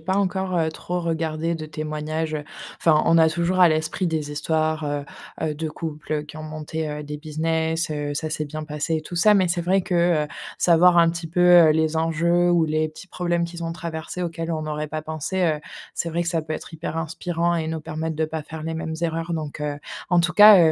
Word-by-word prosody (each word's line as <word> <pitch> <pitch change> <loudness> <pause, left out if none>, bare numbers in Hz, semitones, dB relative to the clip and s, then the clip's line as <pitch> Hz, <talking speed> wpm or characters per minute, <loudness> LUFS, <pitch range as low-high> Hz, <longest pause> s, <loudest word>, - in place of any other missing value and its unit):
pas 190 +4 -1
encore, 190 -2 0
heu, 160 -1 +2
trop 175 +3 -4
regardé 165 0 -1
de 155 -1 -5
témoignages, 155 +1 -3
heu, 150 - -3 0.4
enfin, 155 -2 +5
on 165 - +5
a 160 0 +6
toujours 170 +3 0
à 175 - +8
l'esprit 160 +3 0
des 150 -2 -2
histoires, 155 +1 0
heu 145 -1 -2 0.4
heu, 150 - -2
de 160 +1 -3
couples, 155 -1 -6
heu, 150 -1 0
qui 150 +1 -11
ont 155 - -7
monté, 155 0 -4
heu, 150 0 -5
des 150 0 -6
business, 160 +1 -1
heu, 145 -1 -3
ça 155 +1 -3
s'est 155 -1 -2
bien 155 +1 -6
passé 150 +2 -2
et - - -2
tout 165 +3 -9
ça, 210 +5 +5
mais 190 -2 +4
c'est 175 0 0
vrai 190 +3 +2
que, 175 -4 +2
heu, - - -9 0.3
savoir 175 +1 +5
un 165 -1 +6
petit 165 -1 -3
peu, 170 - -4 0.3
heu, - - +6
les 160 0 +1
enjeux 170 +2 +2
ou 170 -2 +4
les 155 0 0
petits 155 +5 -12
problèmes 175 -2 -1
qu'ils 170 0 -6
ont 165 - -2
traversés, 170 0 -5
auxquels 165 0 -4
on 155 -1 -2
n'aurait 150 0 -3
pas 155 0 -3
pensé, 160 +4 -2
heu, 155 -2 +1 0.3
c'est 170 - -2
vrai 170 +2 0
que - - -1
ça 165 -2 0
peut 155 0 -4
être 165 - -8
hyper 160 0 -5
inspirant 170 +2 -1
et 160 -1 -1
nous 160 -1 -3
permettre 155 +1 -4
de 160 - +1
pas 155 0 -4
faire 160 +1 -8
les 160 0 -3
mêmes 160 0 -4
erreurs 165 +1 -1
donc 150 -2 -5
heu, 145 -1 -2 0.3
en 175 - +4
tout 175 +1 +2
cas, 210 0 +9
160 Hz, 240 wpm, -23 LUFS, 155-170 Hz, 0.4 s, cas